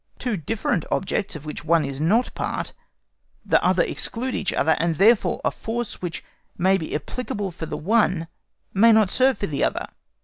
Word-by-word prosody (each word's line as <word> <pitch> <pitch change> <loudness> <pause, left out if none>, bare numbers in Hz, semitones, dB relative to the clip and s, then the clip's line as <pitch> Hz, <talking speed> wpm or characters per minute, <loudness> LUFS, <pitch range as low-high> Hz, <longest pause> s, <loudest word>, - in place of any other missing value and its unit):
Two 245 -4 -2
different 180 0 -1
objects 195 0 -1
of 150 0 -8
which 150 -1 -6
one 165 -1 +3
is 140 +1 -5
not 215 +10 +2
part, - - -3 0.7
the - - +3
other - - +3
exclude 250 +2 -2
each 195 - -1
other, 160 - +2
and 165 0 +1
therefore 215 +6 +4
a - - +2
force 235 0 -5
which 175 -3 -4 0.3
may 190 +2 +3
be 160 -6 -3
applicable 205 +2 -4
for 165 -2 -7
the - - -4
one 185 -3 +1 0.5
may 230 +4 +6
not 215 -3 +4
serve 265 0 +3
for - - -2
the 150 -7 -2
other. - - 0
190 Hz, 180 wpm, -23 LUFS, 160-225 Hz, 0.7 s, may